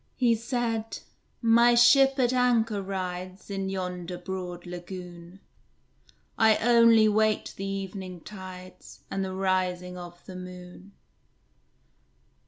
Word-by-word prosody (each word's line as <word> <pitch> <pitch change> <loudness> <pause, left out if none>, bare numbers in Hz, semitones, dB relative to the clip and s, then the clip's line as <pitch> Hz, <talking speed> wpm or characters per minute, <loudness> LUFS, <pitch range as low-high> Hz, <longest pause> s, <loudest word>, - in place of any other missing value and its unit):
He 245 -2 +3
said, 230 -1 -2 0.5
"My 235 +1 +5
ship 270 +3 +6
at 250 -1 +2
anchor 230 -4 +2
rides 185 0 -5
In 195 -1 -3
yonder 180 -2 -4
broad 180 -1 -6
lagoon; 175 0 -9 1.0
I 220 -1 +5
only 230 -2 +5
wait 215 0 +1
the 195 - -5
evening 190 -2 -6
tides, 185 -2 -11
And 195 - -1
the 190 0 -4
rising 180 -1 -1
of 175 0 -11
the 185 - -9
moon." 180 +1 -10
190 Hz, 110 wpm, -27 LUFS, 180-225 Hz, 1.0 s, ship